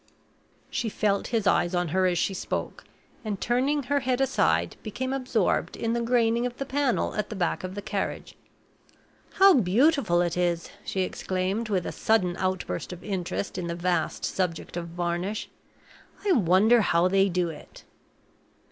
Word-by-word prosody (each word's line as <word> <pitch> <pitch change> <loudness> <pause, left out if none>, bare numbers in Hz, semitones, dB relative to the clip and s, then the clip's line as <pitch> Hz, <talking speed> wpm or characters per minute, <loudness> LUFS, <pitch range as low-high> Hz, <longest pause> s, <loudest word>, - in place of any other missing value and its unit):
She 230 - -1
felt 200 -1 0
his 225 -3 -1
eyes 180 -2 +2
on 175 -1 0
her 185 +3 +2
as 175 -1 +1
she 195 - 0
spoke, - - -4 0.4
and, 210 -3 -3
turning 270 +5 +1
her 285 +3 +1
head 255 -1 0
aside, 85 - +1
became 260 +5 -4
absorbed 260 -2 0
in 230 0 -1
the 235 - 0
graining 235 -1 +2
of 245 - -9
the 275 - -3
panel 275 -2 0
at 210 -1 -2
the 215 - -5
back 180 -2 -1
of 185 +1 -5
the 205 - -5
carriage. 200 -2 -3 1.0
"How 390 0 +7
beautiful 235 - +3
it 175 -1 0
is!" 175 -1 -1
she 190 - -2
exclaimed, 185 +4 -2
with 185 -4 0
a - - -3
sudden 185 -6 +1
outburst 185 0 -2
of 180 - -9
interest 185 -1 -3
in 175 - -3
the 170 - -3
vast 175 -1 -1
subject 180 -4 -2
of 170 -1 -4
varnish. 175 +4 -3 0.8
"I 400 - +3
wonder 215 - +5
how 175 -2 +3
they 195 +1 +3
do 180 -1 0
it?" 155 - -11
195 Hz, 165 wpm, -26 LUFS, 175-235 Hz, 1.0 s, How